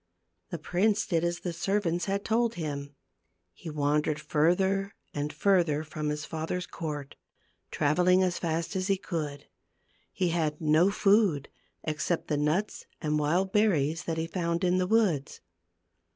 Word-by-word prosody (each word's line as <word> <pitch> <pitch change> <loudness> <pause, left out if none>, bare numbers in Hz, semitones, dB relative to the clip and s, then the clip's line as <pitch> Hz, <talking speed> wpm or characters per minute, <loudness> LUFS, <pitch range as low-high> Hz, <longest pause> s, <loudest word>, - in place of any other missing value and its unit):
The 175 - -4
prince 200 +7 +1
did 165 -3 0
as 175 0 -1
the 175 - -3
servants 175 -1 0
had 200 0 -2
told 230 +1 +1
him. 145 -3 -5 0.6
He 165 - -9
wandered 150 0 0
further 190 +6 +1 0.2
and 145 +1 -2
further 155 -2 +2
from 150 -1 -4
his 150 0 -3
father's 165 +3 -3
court, 150 -4 -6 0.5
traveling 180 +5 +3
as 180 -1 0
fast 165 +2 -2
as 185 0 -1
he 195 -1 +2
could. 155 -6 -4 0.7
He 180 - 0
had 155 -3 -1
no 160 +4 +4
food 200 -8 +3 0.3
except 155 +2 -2
the 150 - +1
nuts 155 +8 -1
and 150 -1 0
wild 175 +6 +1
berries 170 -6 +2
that 165 -1 -2
he 160 - -1
found 170 0 -2
in 180 0 +3
the 180 - +1
woods. 190 -10 +1
170 Hz, 150 wpm, -29 LUFS, 150-190 Hz, 0.7 s, no